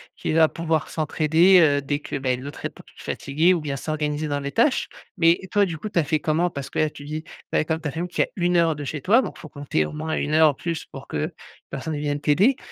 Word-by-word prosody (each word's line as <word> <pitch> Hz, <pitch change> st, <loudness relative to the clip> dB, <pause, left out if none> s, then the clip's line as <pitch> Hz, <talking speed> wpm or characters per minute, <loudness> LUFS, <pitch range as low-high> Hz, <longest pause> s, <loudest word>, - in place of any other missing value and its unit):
qui -, -, -3 dB
va 160 Hz, 0 st, +6 dB
pouvoir 160 Hz, -1 st, -1 dB
s'entraider, 160 Hz, +4 st, +4 dB
heu, 145 Hz, -3 st, +4 dB
dès 145 Hz, +1 st, -2 dB
que, 145 Hz, -, -5 dB
beh, 130 Hz, -2 st, 0 dB
l'autre 140 Hz, +3 st, -9 dB
est -, -, 0 dB
peu -, -, -16 dB
p -, -, -21 dB
fatigué 160 Hz, +6 st, +1 dB
ou 170 Hz, -, -1 dB
bien 145 Hz, -2 st, -3 dB
s'organiser 150 Hz, +1 st, -2 dB
dans 145 Hz, -1 st, -1 dB
les 140 Hz, 0 st, -4 dB
tâches, 255 Hz, -, +2 dB, 0.3 s
mais 165 Hz, +1 st, +4 dB
toi, 205 Hz, -1 st, +4 dB
du 165 Hz, -3 st, -4 dB
coup, 215 Hz, -, -6 dB
tu 200 Hz, -, -5 dB
as -, -, +3 dB
fait 155 Hz, +1 st, 0 dB
comment? 160 Hz, +4 st, +1 dB
Parce 140 Hz, -3 st, -6 dB
que -, -, -7 dB
là, 155 Hz, -, +3 dB
tu 145 Hz, -, -12 dB
dis, 155 Hz, +2 st, -5 dB, 0.3 s
ben, 155 Hz, -, +2 dB
comme 160 Hz, 0 st, -1 dB
ta 150 Hz, -, -2 dB
famille 170 Hz, +5 st, -3 dB
qui -, -, 0 dB
est -, -, +4 dB
à -, -, -20 dB
1 175 Hz, -1 st, +2 dB
heure 165 Hz, -2 st, +3 dB
de 145 Hz, -, -6 dB
chez 145 Hz, +1 st, -4 dB
toi 225 Hz, -, +5 dB
donc 215 Hz, -, -6 dB
faut 155 Hz, -, -11 dB
compter 145 Hz, -, -1 dB
au -, -, -6 dB
moins 160 Hz, +1 st, -3 dB
1 150 Hz, -, -2 dB
heure 155 Hz, -1 st, +6 dB
ou -, -, -9 dB
plus 165 Hz, +3 st, -4 dB
pour 135 Hz, 0 st, -11 dB
qu'une 75 Hz, -, -2 dB, 0.4 s
personne 150 Hz, +3 st, -4 dB
vienne 145 Hz, 0 st, -2 dB
t'aider, 195 Hz, -, +3 dB
155 Hz, 275 wpm, -23 LUFS, 145-165 Hz, 0.4 s, va